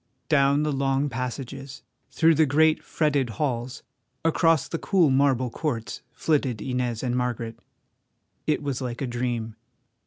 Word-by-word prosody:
Down 140 -1 +4
the 150 - 0
long 135 +1 +1
passages, 130 +2 -6 0.3
through 165 0 +4
the 155 0 +3
great, 155 +3 +3
fretted 145 -5 0
halls, 125 -3 -2 0.4
across 165 -2 +3
the 165 - -4
cool 175 -8 +3
marble 130 -2 +2
courts, 120 -7 -3
flitted 140 -8 0
Inez 125 -1 -2
and 125 -1 0
Margaret. 120 -2 -2 0.9
It 150 - +1
was 140 -2 -2
like 125 +1 -4
a - - 0
dream. 120 -2 -3
135 Hz, 135 wpm, -25 LUFS, 125-150 Hz, 0.9 s, Down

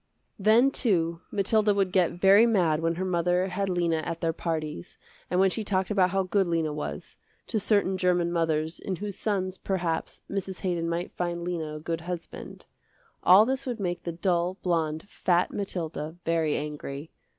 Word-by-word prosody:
Then, 225 +7 +5
too, 170 -10 0
Mathilda 210 +1 +2
would 195 -2 +1
get 180 -3 +2
very 200 +5 +7
mad 175 -9 +2
when 165 0 0
her 185 +2 -2
mother 180 +1 +1
had 195 +2 -2
Lena 170 -2 +1
at 165 +1 -4
their 165 -1 0
parties, 155 - -4 0.3
and 180 - +1
when 190 0 +4
she 220 - -2
talked 190 -1 0
about 190 -3 +3
how 195 +1 +1
good 190 +1 +1
Lena 165 -3 0
was, 150 - -6 0.3
to 220 - -1
certain 195 -2 +1
german 180 -2 +2
mothers 160 -1 0
in 190 - -3
whose 205 +1 -5
sons, 190 -3 -2
perhaps, 175 -4 -2
Mrs. 195 -2 -4
Haydon 170 -3 -1
might 170 +1 -2
find 175 -1 -2
Lena 165 -3 -3
a - - -6
good 165 +1 -3
husband. 175 0 -7 0.6
All 195 +4 +7
this 265 +2 -2
would 240 -3 -3
make 175 -3 -2
the 170 - -4
dull, 175 +1 0
blonde, 160 -1 -1
fat 175 -3 +1
Mathilda 165 -5 -4
very 165 -2 +1
angry. 150 0 -6
180 Hz, 175 wpm, -27 LUFS, 165-195 Hz, 0.6 s, very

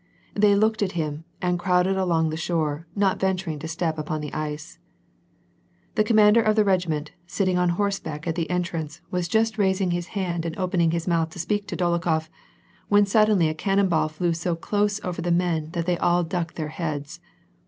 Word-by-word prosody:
They 205 0 +4
looked 220 +2 +2
at 190 -2 0
him, 155 -2 -3 0.2
and 180 -1 +1
crowded 180 +1 +2
along 170 -4 +1
tbe 160 - -4
shore, 160 -1 -1
not 195 -2 +1
venturing 185 -5 -1
to 160 - -6
step 160 -1 -2
upon 155 0 -3
the 150 -1 -6
ice. 155 0 -5 1.1
The 215 - +3
commander 215 +1 +5
of 215 -1 +2
the 215 - +4
regiment, 170 -6 0 0.2
sitting 185 -1 0
on 180 0 +2
horseback 195 -7 -2
at 165 - 0
the 165 -1 -3
entrance, 170 -4 -3
was 180 -1 -1
just 220 +2 +1
raising 190 -2 +2
his 175 0 -2
hand 175 -3 -1
and 165 -1 -4
opening 180 -3 +1
his 170 +1 -2
mouth 165 -2 +1
to 160 - -13
speak 205 +4 -1
to - - -4
Dolokbof, 170 -3 0 0.6
when 205 0 +5
suddenly 210 -4 +4
a 155 - -1
cannon 195 +4 +1
ball 155 -2 +2
flew 170 +2 -1
so 170 +1 -1
close 205 +4 0
over 180 -2 -3
the 175 - -2
men 170 -3 +1
tbat 170 -1 -3
they 175 -1 0
all 175 0 +3
ducked 170 -1 -3
their 155 -2 -3
heads. 155 0 -4
175 Hz, 195 wpm, -24 LUFS, 160-195 Hz, 1.1 s, commander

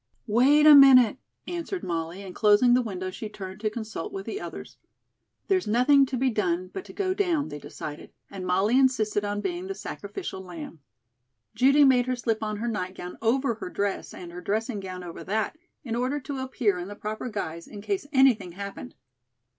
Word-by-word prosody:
"Wait 260 +7 +4
a 305 - +10
minute," 265 -4 +8 0.3
answered 350 +2 -4
Molly, 170 +2 -4
and 190 -2 -8
closing 210 +4 +5
the 250 - +4
window, 185 -5 -4
she 215 +3 -6
turned 190 -2 -8
to 215 0 0
consult 215 -5 -6
with 195 0 -6
the 400 - -5
others. - - -8 0.7
"There's 375 - +1
nothing 265 +5 +4
to 255 - -3
be 260 +1 +1
done 185 -4 -1
but 380 - -6
to - - -11
go 375 -2 -1
down," 350 -7 0
they 145 - -7
decided, 150 +1 -8 0.2
and 195 -2 -8
Molly 195 +7 +2
insisted 220 -6 +2
on 205 0 -2
being 355 - -3
the 390 - -4
sacrificial 370 - -6
lamb. 170 -3 -9 0.7
Judy 275 +3 +5
made 250 -2 +4
her 255 - 0
slip 230 -2 -1
on 215 -1 -2
her 230 +3 -3
nightgown 185 -4 -4
over 240 +3 +2
her 215 -4 -7
dress, 200 +1 -2
and 175 -1 -9
her 175 +1 -8
dressing 220 +4 -2
gown 185 -2 -7
over 170 -1 -8
that, 215 +6 -1 0.3
in 230 -4 -3
order 255 +4 -1
to 275 0 -5
appear 245 -7 0
in 175 - -5
the 205 - -8
proper 215 +4 -5
guise 170 -6 -5
in 205 - -9
case 375 - -2
anything 260 - +3
happened. 200 - -8
220 Hz, 195 wpm, -26 LUFS, 190-265 Hz, 0.7 s, a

